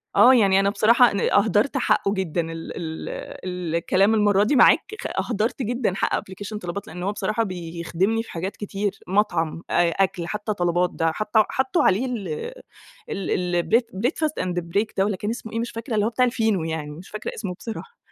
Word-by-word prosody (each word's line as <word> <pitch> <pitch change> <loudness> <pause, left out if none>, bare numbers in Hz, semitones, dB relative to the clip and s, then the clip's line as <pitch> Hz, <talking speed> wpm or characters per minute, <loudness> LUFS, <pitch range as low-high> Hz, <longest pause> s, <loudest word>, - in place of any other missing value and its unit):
آه، 255 - +8
يعني 195 -6 +5
أنا 195 0 +3
بصراحة 230 +4 +5
ن 200 - -1
أهدَرت 215 +6 +2
حقّه 200 -5 +2
جدًا 185 -4 -1
ال 165 0 -6
ال 160 -2 -5 0.4
ال 180 -3 -3
الكلام 195 +5 +3
المرَّة 205 -2 +4
دي 240 +8 +2
معاك 350 - +5
خ - - -3 0.2
أهدَرت 225 +4 -1
جدًا 240 -3 0
حق - - 0
أبلكيشن 200 +3 -6
طلبات، 180 0 -5
لأن 180 +1 -7
هو 195 - 0
بصراحة 215 +2 -1
بيخدِمني 180 +3 -2
في - - -12
حاجات 185 +4 -4
كتير، 205 -1 -3
مطعم، 175 -5 0
أ 175 - +3
أكْل، 175 -3 -2
حتى 210 +2 -2
طلبات 175 -1 +1
ده 165 -1 +1
حط 210 +6 -5
حطوا 260 +8 +2
عليه 205 +8 +3
ال 235 -7 -4 0.8
ال 195 - -3 0.2
ال 175 - 0
bre 235 - +7 0.2
breadfast 310 - 0
and 180 -1 -2
break 175 +6 -1
ده 190 - +4
والّا 205 -2 -1
كان 205 - -3
اسمه 230 -2 -6
إيه 230 - -1
مش 235 +1 -3
فاكرة، 230 +2 -6
اللي 210 -1 +2
هو - - +2
بتاع 250 +2 +2
الفينو 225 -7 +1
يعني، 160 -2 -4
مش 170 +5 -11
فاكرة 215 0 -5
اسمه 200 -5 -4
بصراحة. 235 - -8
200 Hz, 200 wpm, -23 LUFS, 175-225 Hz, 0.8 s, آه